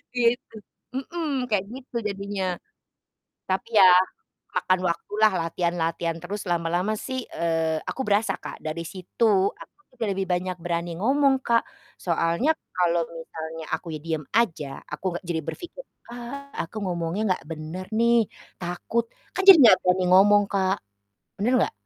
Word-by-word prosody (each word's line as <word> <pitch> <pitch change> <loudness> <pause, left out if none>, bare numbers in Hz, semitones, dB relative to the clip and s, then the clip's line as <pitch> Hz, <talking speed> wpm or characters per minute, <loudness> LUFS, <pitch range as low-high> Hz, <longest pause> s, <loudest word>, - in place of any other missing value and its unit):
Gitu. 240 -1 +1 0.4
Mhm, 280 -2 -2
kayak 200 -3 +2
gitu 255 0 -11
jadinya. 195 -2 -3 0.9
Tapi 190 +4 -1
ya, 185 - +9 0.7
makan 185 0 +2
waktulah, 210 +5 +2
latihan-latihan 165 -1 -1
terus, 200 +3 -5
lama-lama 175 +4 0
sih, 260 +1 -4
eee, 165 -1 0
aku 265 - -3
berasa, 205 -1 +2
Kak, - - -9
dari 155 +2 -3
situ 185 +6 -2 0.3
aku - - -15 0.2
juga 230 - -1
lebih 195 0 -2
banyak 180 0 0
berani 170 0 -2
ngomong, 275 +3 +4
Kak, 230 -1 +4 0.4
soalnya 170 - 0 0.2
kalo 175 -1 +2 0.2
misalnya 160 0 -7
akunya 160 -3 -3
diem 160 -2 -2
aja, 165 -10 +1 0.3
aku 150 +4 -6
nggak 180 - -13
jadi 160 -2 0
berpikir, 360 +8 -7 0.3
"Ah, 245 +4 -7 0.2
aku 170 - -12
ngomongnya 175 +2 -2
nggak - - -13
bener, 160 +4 -6
nih, 235 0 +5 0.4
takut," 180 +7 -1 0.3
kan, 380 - +1
jadi 385 -4 +11
nggak 220 -6 +9
berani 180 0 +3
ngomong, 205 +2 +6
Kak, 190 -1 +1 0.6
bener 230 +6 +1
nggak? - - +1
185 Hz, 140 wpm, -25 LUFS, 170-235 Hz, 0.9 s, jadi